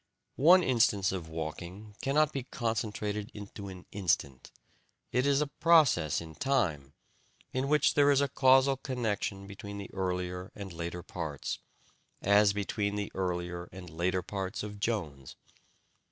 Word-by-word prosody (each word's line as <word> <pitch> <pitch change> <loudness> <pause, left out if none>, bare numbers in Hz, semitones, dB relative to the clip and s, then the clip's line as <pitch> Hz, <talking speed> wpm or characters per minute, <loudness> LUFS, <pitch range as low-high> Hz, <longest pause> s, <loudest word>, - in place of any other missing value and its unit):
One 180 +5 +8
instance 110 - +3
of 90 -4 -5
walking 85 +6 -6
cannot 150 +2 +2
be 135 - -2
concentrated 105 -3 -2
into 100 -1 -8
an 95 -2 -9
instant: 70 -9 -1 0.6
it 125 +3 +2
is 140 0 +3
a - - +2 0.2
process 155 - +5
in 80 -1 -9
time, 80 - 0 0.6
in 130 +1 0
which 150 +1 +4
there 145 -1 +5
is 140 -1 +5
a 140 - +2
causal 135 0 +4
connection 110 -7 -2
between 100 +1 -8
the 100 - -8
earlier 90 0 -3
and 100 -3 -7
later 85 +1 -5
parts, 80 -10 -4 0.6
as 100 +1 +5
between 100 0 -1
the 105 0 -3
earlier 90 -1 -2
and 90 -2 -10
later 90 +3 0
parts 95 -1 -4
of 105 -1 -7
Jones. 80 - -3
100 Hz, 140 wpm, -31 LUFS, 90-125 Hz, 0.6 s, One